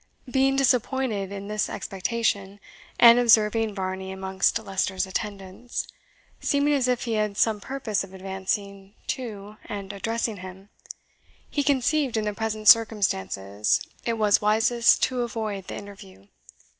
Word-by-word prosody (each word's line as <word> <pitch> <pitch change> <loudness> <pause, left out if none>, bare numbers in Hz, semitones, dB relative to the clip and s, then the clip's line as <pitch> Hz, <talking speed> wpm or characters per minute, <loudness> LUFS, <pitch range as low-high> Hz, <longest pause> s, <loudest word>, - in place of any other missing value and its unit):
Being 270 +1 +2
disappointed 250 -6 +1
in 200 0 -6
this 210 0 -1
expectation, 200 0 -2 0.4
and 235 0 +8
observing 225 -2 +3
Varney 190 0 -4
amongst 190 +2 0
Leicester's 190 -3 -2
attendants, 195 +3 -5 0.5
seeming 285 +1 +1
as 265 -3 +2
if 250 -1 0
he 235 - -2
had 210 -2 -1
some 215 -2 +2
purpose 250 -5 -2
of 195 - -11
advancing 195 +1 -4
to 210 -5 -5
and 200 -1 -6
addressing 225 +1 -2
him, 185 +1 -11 0.8
he 290 - 0
conceived, 280 -2 +1
in 215 - -1
the 210 - -1
present 215 0 -3
circumstances, 105 - +3 0.2
it 235 - -1
was 210 -2 +3
wisest 225 +3 +3
to 255 -1 +1
avoid 220 -5 -4
the - - -6
interview. 100 - -11
210 Hz, 130 wpm, -25 LUFS, 195-235 Hz, 0.8 s, and